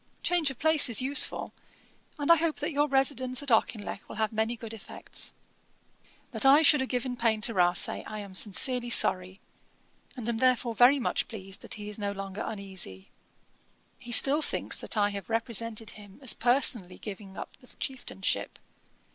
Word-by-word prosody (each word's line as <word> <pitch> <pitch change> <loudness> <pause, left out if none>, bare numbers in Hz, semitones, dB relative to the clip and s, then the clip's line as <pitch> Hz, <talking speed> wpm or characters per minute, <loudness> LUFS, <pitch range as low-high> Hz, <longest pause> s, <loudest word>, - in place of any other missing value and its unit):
Change 345 -4 +1
of 270 - -8
place 315 -2 +6
is 230 - +3
useful; 270 +2 +2 0.6
and 290 +2 +1
I - - +9
hope 320 0 -1
that - - -4
your 290 0 +1
residence 270 -1 +1
at 280 - -4
Auchinleck 220 -2 -1
will - - -8
have 220 +1 -2
many 220 +2 -1
good 225 -1 -8
effects. 220 - -6 1.0
'That - - -3
I 280 +4 +6
should 295 0 +5
have 265 - -3
given 250 0 -2
pain 230 -2 +1
to 230 - -1
Rasay, 175 -2 +1
I 215 - -7
am 200 -2 -9
sincerely 240 +6 0
sorry; 185 -4 +4 0.8
and 235 -2 -4
am 235 -1 -1
therefore 250 -2 +1
very 245 +5 +5
much 245 - -1
pleased 195 -3 -7
that - - -6
he 210 -1 -9
is 210 0 -5
no 200 -1 -3
longer 195 +1 -7
uneasy. 190 - -5 0.9
He 245 -1 -11
still 280 +5 +5
thinks - - -3
that - - -2
I 205 0 +2
have 200 0 -8
represented 230 -1 -2
him 205 -2 -14
as 255 - +3
personally 235 -7 +1
giving 195 -2 -10
up - - -8
the 250 - -19
Chieftainship. 245 -8 -4
230 Hz, 175 wpm, -28 LUFS, 205-260 Hz, 1.0 s, I